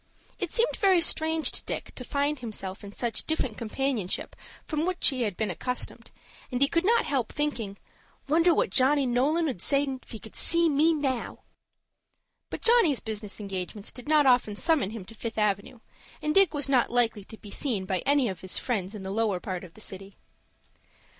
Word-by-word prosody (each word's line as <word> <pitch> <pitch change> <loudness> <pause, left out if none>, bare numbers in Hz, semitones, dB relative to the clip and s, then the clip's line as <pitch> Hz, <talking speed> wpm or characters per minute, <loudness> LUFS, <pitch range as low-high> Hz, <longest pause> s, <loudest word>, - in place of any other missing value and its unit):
It - - -3
seemed 470 +1 +2
very 385 -4 +4
strange 320 -1 +2
to - - -4
Dick - - -5
to 250 - -8
find 285 +2 -1
himself 205 -5 -4
in 200 - -8
such 230 +1 -2
different 260 -8 -1
companionship 230 -3 -2 0.3
from 310 -1 -1
what 365 +1 -2
he 265 -3 +3
had 210 -6 -1
been 215 -3 -1
accustomed, 250 +8 -4 0.4
and 250 - -1
he 280 - +4
could 335 +4 +1
not 465 +3 +4
help 260 -6 -1
thinking, 235 -10 -2 0.5
"Wonder 330 +4 +4
what - - +1
Johnny 275 +1 +3
Nolan 280 +7 +2
'ould 245 - -4
say 280 +5 +2
if 265 -2 -6
he 225 - -6
could 220 - -12
see 335 0 +5
me 305 +3 +4
now!" 275 -6 -2 1.1
But - - -6
Johnny's 455 - +4
business 215 -2 -5
engagements 195 +1 -5
did 250 +3 -9
not 305 -2 +5
often 245 -5 +3
summon 310 - +1
him 215 -3 -7
to 220 - -12
Fifth 225 +1 -6
Avenue, 210 +2 -1 0.4
and 300 - -1
Dick 390 -3 +5
was 290 -2 -1
not 260 -3 +3
likely 230 -4 +1
to 220 - -11
be 205 - -12
seen 220 -9 -2
by 185 -1 -1
any 280 +1 +2
of 190 -4 -5
his 185 0 -2
friends 210 -4 -2
in 200 - -7
the 190 - -5
lower 210 -3 0
part 185 0 -5
of 175 -3 -13
the 215 - -13
city. 195 0 -9
250 Hz, 195 wpm, -27 LUFS, 210-295 Hz, 1.1 s, see